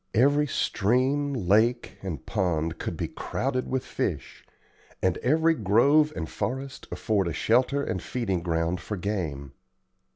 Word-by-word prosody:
Every 145 +5 +4
stream, 130 +6 +1
lake, 115 +1 +1
and 85 -9 -5
pond 80 -3 -1
could - - -4
be - - -2
crowded 130 -1 -2
with 130 0 -1
fish, - - -4 0.6
and 95 -2 +1
every 160 +5 +3
grove 140 +7 +4
and 80 -2 -3
forest 135 - -4
afford 100 -5 0
a 85 - -2
shelter 130 - +2
and 95 - -2
feeding 100 -8 -2
ground 85 +1 -1
for 105 - -5
game. 80 -9 -3
110 Hz, 135 wpm, -27 LUFS, 90-135 Hz, 0.6 s, Every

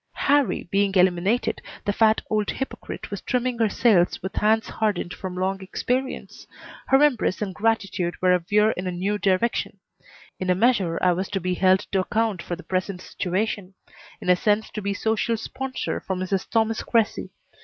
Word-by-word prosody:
Harrie 285 -7 +2
being 200 0 +2
eliminated, 185 +5 +2 0.2
the 205 - +1
fat 220 +1 +3
old 215 -2 0
hypocrite 265 - -5
was - - -4
trimming 250 -1 -1
her 225 -2 +3
sails 205 -5 +3
with 190 - -4
hands 220 +1 +2
hardened 205 -5 -1
from 185 -1 -6
long 190 +1 -1
experience. 250 +7 -3 0.4
Her 270 +2 +5
embraces 245 -8 +2
and 195 -2 -4
gratitude 195 -5 -1
were 185 0 +4
a 180 - +3
veer 210 +5 +3
in 185 -2 -4
a - - -1
new 195 +4 -1
direction. 195 +4 0 0.6
In 185 - -2
a 180 - +4
measure 195 -6 +2
I 180 - +5
was 185 +2 -2
to 200 - -1
be 180 0 -1
held 185 +1 +4
to 195 - +2
account 215 -1 0
for 175 - -4
the 180 - -12
present 185 0 -2
situation; 190 +1 -3 0.4
in - - -8
a 180 - +7
sense 210 +3 +1
to 215 - -5
be 200 0 -2
social 225 +2 0
sponsor 260 +4 -4
for 190 - -4
Mrs. 185 +1 -2
Thomas 225 -1 +1
Cressy. 230 -3 0
200 Hz, 180 wpm, -24 LUFS, 185-225 Hz, 0.6 s, a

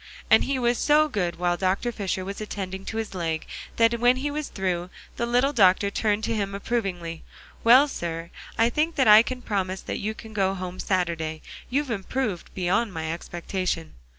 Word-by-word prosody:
And - - +6
he 275 - 0
was 240 -1 +1
so 305 +1 +4
good 185 - -2
while 175 0 0
Dr. 190 +6 0
Fisher 190 -4 -3
was 200 +2 -6
attending 195 -2 -5
to 220 - -4
his 220 -3 -3
leg 165 -3 -2 0.3
that 230 0 +3
when 245 +2 +5
he 285 +3 -2
was 300 0 -3
through, 180 -2 -2 0.3
the 235 - -2
little 250 +4 +2
doctor 200 -3 +4
turned 210 0 0
to - - 0
him 200 -2 -2
approvingly: 190 -7 -3 0.4
"Well, 255 +5 +7
sir, 170 - -5 0.3
I 230 +1 +3
think 315 +5 0
that 265 -5 +3
I 210 +1 +10
can 250 +1 -5
promise 190 -3 -2
that - - -4
you 215 +2 -3
can 220 -1 -11
go 195 -2 +1
home 185 -1 -6
Saturday. 165 -4 -1 0.3
You've 275 0 0
improved 210 -1 -3
beyond 195 +5 +1
my 160 -2 -3
expectation." 175 -1 -4
200 Hz, 185 wpm, -25 LUFS, 180-235 Hz, 0.4 s, I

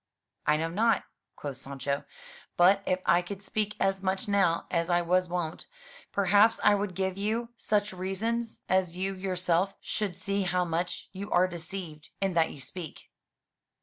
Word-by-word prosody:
"I 150 - +5
know 165 +1 -1
not," 225 +4 +3 0.3
quoth 140 -3 -6
Sancho, 140 +1 -3 0.5
"but 190 +3 +6
if 185 0 +1
I 170 +3 +5
could 195 +2 -7
speak 210 +1 -1
as 195 0 +1
much 190 +3 -1
now 195 -5 +2
as 170 0 +1
I 175 0 +3
was 180 +1 +2
wont, 170 -2 -3 0.4
perhaps 205 +3 +4
I 205 - +7
would 200 -2 -1
give 190 0 -1
you 225 +3 -1
such 210 -2 0
reasons 220 +5 -2
as 180 -2 +1
you 190 +1 -1
yourself 185 0 0
should 205 -5 -3
see 200 +2 -1
how 180 -1 +1
much 170 +1 -2
you 200 +2 -6
are 180 +1 +4
deceived 170 -3 -7
in 195 -1 +1
that 165 -1 +3
you - - -9
speak." 160 +3 -9
185 Hz, 165 wpm, -29 LUFS, 175-200 Hz, 0.5 s, I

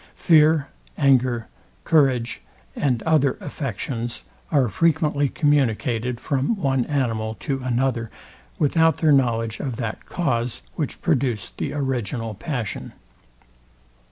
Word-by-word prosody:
Fear, 155 -3 +4 0.3
anger, 130 -5 +3 0.4
courage, 130 -7 +2 0.3
and 125 -5 0
other 150 -4 +2
affections 120 -4 -4 0.3
are 140 -5 +3
frequently 150 - +1
communicated 125 -5 +1
from 140 - 0
one 135 - 0
animal 115 -6 -1
to 135 -3 -2
another, 125 -2 0 0.5
without 160 +2 +3
their 155 -2 +3
knowledge 115 -5 +2
of 130 -4 -3
that 115 -2 -5
cause, 120 - -1
which - - -4
produced 120 -6 -1
the - - -2
original 120 -5 -2
passion. 115 - -4
130 Hz, 105 wpm, -23 LUFS, 115-145 Hz, 0.5 s, Fear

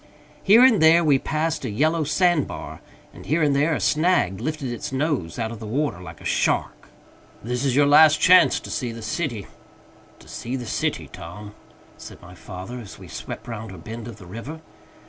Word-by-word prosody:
Here 220 +5 +6
and 235 -8 +4
there 165 +2 +6
we 145 -4 +3
passed 155 +1 -2
a 125 - -3
yellow 155 +9 +1
sand 175 0 +2
bar, - - -8 0.3
and - - -12
here 155 +4 +1
and 145 -2 +2
there 150 +3 +2
a - - -2
snag 155 - +1
lifted 155 -5 -3
its 120 - -5
nose 130 - -2
out 115 -2 -3
of 115 - -8
the 110 - -8
water 135 -5 -2
like 85 -2 -10
a - - -14
shark. - - -1 0.5
"This 125 +3 -3
is 135 -3 +1
your 145 +1 +5
last 155 +2 +6
chance 185 0 +6
to - - -9
see 120 -2 -3
the 115 -1 -9
city, 120 - -3 0.7
To - - -18
see 120 +3 -5
the 125 -2 -5
city, - - -2
Tom," 105 +5 -10 0.5
said - - -11
my 90 +1 -14
father, 95 +6 -8
as 110 -5 -11
we - - -12
swept - - -8
round 110 -1 -6
a - - -10
bend 110 +7 -8
of 115 -3 -9
the 95 - -13
river. 115 - -8
130 Hz, 205 wpm, -23 LUFS, 110-155 Hz, 0.7 s, Here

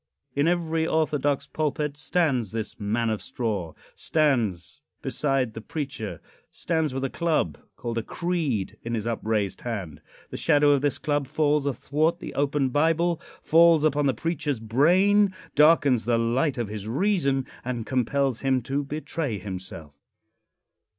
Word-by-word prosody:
In 145 +2 +2
every 165 -2 +1
orthodox 145 -3 +1
pulpit 150 0 -2
stands 145 - 0
this 110 0 -5
man 110 +2 0
of 110 - -2
straw 100 -10 -3 0.2
stands 120 - 0 0.2
beside 135 -3 0
the 110 - -7
preacher 125 - -5 0.3
stands 160 -4 -1
with 135 +1 -3
a 135 - 0
club, 160 - 0 0.2
called 115 -1 -3
a - - -2
"creed," 150 - -2
in 115 0 -2
his 110 -1 -3
upraised 110 -3 -1
hand. 95 -11 -5 0.3
The - - -5
shadow 145 -2 +4
of 140 -2 +3
this 145 -2 0
club 145 -2 -1
falls 150 0 +1
athwart 155 +5 0
the - - -8
open 140 -1 +1
Bible 165 +4 +1 0.2
falls 165 -1 +5
upon 145 -1 +2
the 135 - +1
preacher's 150 -2 -2
brain, 185 - +3 0.2
darkens 145 -5 +4
the 120 -1 +2
light 125 +5 +1
of 120 -3 -1
his 105 0 -6
reason 140 - +1 0.2
and 120 -3 -3
compels 130 0 0
him 130 -2 +1
to 140 +4 -1
betray 150 -3 -3
himself. 95 -6 -8
140 Hz, 145 wpm, -25 LUFS, 115-155 Hz, 0.3 s, falls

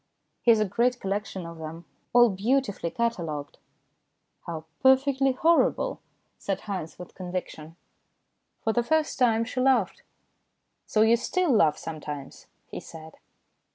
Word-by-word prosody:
He - - +1
has 225 -2 +6
a 215 - +2
great 245 +5 +1
collection 195 -2 -3
of 170 -1 -9
them, 160 +2 -8 0.3
all 240 -2 +6
beautifully 205 -2 0
catalogued." 165 -11 -3 0.4
" - - -33
How 160 -2 -5 0.2
perfectly 265 0 +4
horrible," 330 +6 +2 0.4
said 195 - -3
Haynes 185 -6 -5
with 180 - -11
conviction. 175 -4 -6 0.9
For 220 - +1
the 240 - +2
first 315 +5 0
time 230 -2 +3
she 250 +2 -4
laughed. 250 -8 +2 0.5
" - - -51
So 215 - +3
you 230 +1 +5
still 350 +7 0
laugh 160 -10 +4
sometimes," 150 -3 -7 0.2
he - - -7
said. 160 -1 -12
215 Hz, 140 wpm, -26 LUFS, 170-250 Hz, 0.9 s, has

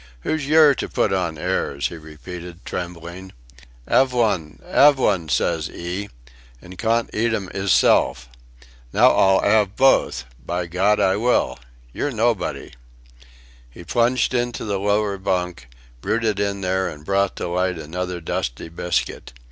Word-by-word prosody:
"Who's 155 - -2
yer 155 -1 +6
to - - -5
put - - 0
on - - -1
airs," 70 0 -1
he - - -8
repeated, 85 +3 -10
trembling. 90 +1 -7 0.5
"'Ave 130 -1 +3
one 95 -10 0
'ave 145 -1 +5
one, 95 -10 +1
says - - 0
'ee 90 +4 -5 0.5
an' 90 +6 -12
cawn't 115 +3 0
eat 115 +1 +1
'em 95 -4 -5
'isself. 80 -9 +2 0.6
Now - - +5
I'll 95 0 +4 0.2
'ave 100 -1 -5
both. 135 - +3 0.2
By 90 +4 -2
Gawd 95 +5 +1
I 95 +1 +2
will! 120 - +1 0.3
Yer 145 - -2
nobody!" 115 -4 -1 1.0
He 75 +8 -12
plunged 120 +9 +1
into 120 -2 -1
the 100 -2 -2
lower 100 0 0
bunk, 90 -8 -2 0.3
rooted 110 -3 0
in 100 -1 -1
there 95 0 0
and 75 0 -11
brought 100 0 +1
to - - -4
light 90 0 0
another 90 +3 -4
dusty 70 -4 -4
biscuit. 85 -4 -3
95 Hz, 140 wpm, -22 LUFS, 85-110 Hz, 1.0 s, yer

